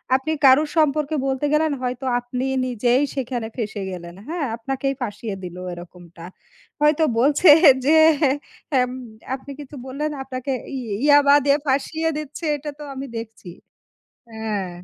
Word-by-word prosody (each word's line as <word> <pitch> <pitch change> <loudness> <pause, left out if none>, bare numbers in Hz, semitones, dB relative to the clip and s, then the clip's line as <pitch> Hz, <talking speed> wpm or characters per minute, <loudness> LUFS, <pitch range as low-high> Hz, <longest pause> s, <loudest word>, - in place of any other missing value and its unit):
আপনি 265 +4 -1
কারো 265 +3 +7
সম্পর্কে 305 0 +2
বলতে 265 +2 -1
গেলেন, 310 0 +2
হয়তো 250 +1 -3
আপনি 250 +1 -5 0.2
নিজেই 245 +2 +1
সেখানে 245 -3 -3
ফেঁসে 215 -4 -4
গেলেন, 170 -1 -8
হ্যাঁ? 325 -3 -2
আপনাকেই 270 +3 -2
ফাঁসিয়ে 210 -2 -4
দিলো 180 0 -7
এরকমটা। 175 -1 -12 0.6
হয়তো 300 +1 +4 0.2
বলছে 295 +6 +4 0.4
যে, 305 - +4 0.9
এম 250 0 +1 0.4
আপনি 275 +1 -11
কিছু 290 0 -10
বললেন 300 +3 -3
আপনাকে 260 +1 -5 0.3
ই - - -3 0.3
ইয়াবা 285 -1 +6
দিয়ে 280 +1 +4
ফাঁসিয়ে 315 +4 0
দিচ্ছে 305 +2 -6
এটা 295 +1 -7
তো - - -7
আমি 270 +1 -6
দেখছি। 225 -4 -9 0.9
হ্যাঁ। 210 -4 -3
265 Hz, 140 wpm, -22 LUFS, 225-290 Hz, 0.9 s, কারো